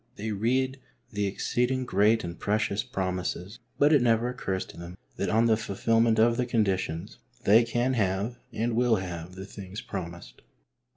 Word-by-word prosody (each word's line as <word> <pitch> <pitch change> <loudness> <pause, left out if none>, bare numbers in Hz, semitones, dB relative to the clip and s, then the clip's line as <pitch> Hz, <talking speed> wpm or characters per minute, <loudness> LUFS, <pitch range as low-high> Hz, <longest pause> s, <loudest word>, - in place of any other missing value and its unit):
They 110 +2 -4
read 130 +6 0 0.3
the 105 -2 -1
exceeding 125 +6 0
great 110 +1 +3
and 85 0 -6
precious 105 -1 0
promises, 95 +2 -3 0.2
but 145 +2 +5
it 145 - +5
never 120 0 +3
occurs 95 -7 -3
to - - -13
them 85 +1 -9 0.2
that - - -1
on 115 +2 +3
the 115 -1 +4
fulfilment 115 +2 +1
of 115 +1 +4
the 125 -1 0
conditions 95 -5 -1 0.2
they 110 +4 +6
can 120 +3 0
have 105 +2 -1
and 115 +1 -1
will 120 -1 +3
have 90 -2 -5
the 95 +1 -7
things 100 0 -8
promised. 85 -3 -7
110 Hz, 165 wpm, -28 LUFS, 95-120 Hz, 0.3 s, they